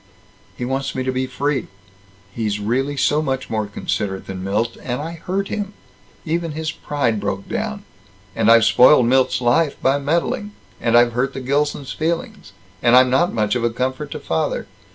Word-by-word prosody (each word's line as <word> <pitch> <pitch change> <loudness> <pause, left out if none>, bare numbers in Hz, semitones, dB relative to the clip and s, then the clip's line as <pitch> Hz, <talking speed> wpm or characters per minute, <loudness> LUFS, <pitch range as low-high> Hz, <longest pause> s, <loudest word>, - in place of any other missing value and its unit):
"He 125 - -3
wants 135 +2 -2
me 130 - -1
to 130 - -1
be 130 0 -1
free. 140 +2 -1 0.7
He's 105 -2 -2
really 130 +7 -1
so 150 +2 +2
much 135 -3 -3
more 110 -2 -1
considerate 100 -1 -3
than 95 -1 -6
Milt. 110 +4 -1
And 125 0 -3
I 160 +3 -4
hurt 185 +4 -3
him. 205 -1 -3 0.5
Even 165 0 -1
his 155 0 -3
pride 140 -8 -1
broke 100 -1 -3
down. 215 -2 -3 0.5
And 110 -1 +2
I've 115 -1 +7
spoiled 125 +2 +6
Milt's 130 +1 +2
life 135 +6 +2
by 135 +2 +2
meddling. 170 +8 -1 0.3
And 120 0 +4
I've 120 0 +4
hurt 125 +3 -1
the - - -3
Gilsons' 140 +1 -1
feelings. 170 - -3 0.3
And 120 +1 +5
I'm 130 0 +6
not 170 +7 +3
much 105 -2 0
of 120 -2 -1
a 120 - +3
comfort 130 +5 -3
to - - -5
father. 80 -1 -1
130 Hz, 180 wpm, -20 LUFS, 115-150 Hz, 0.7 s, I've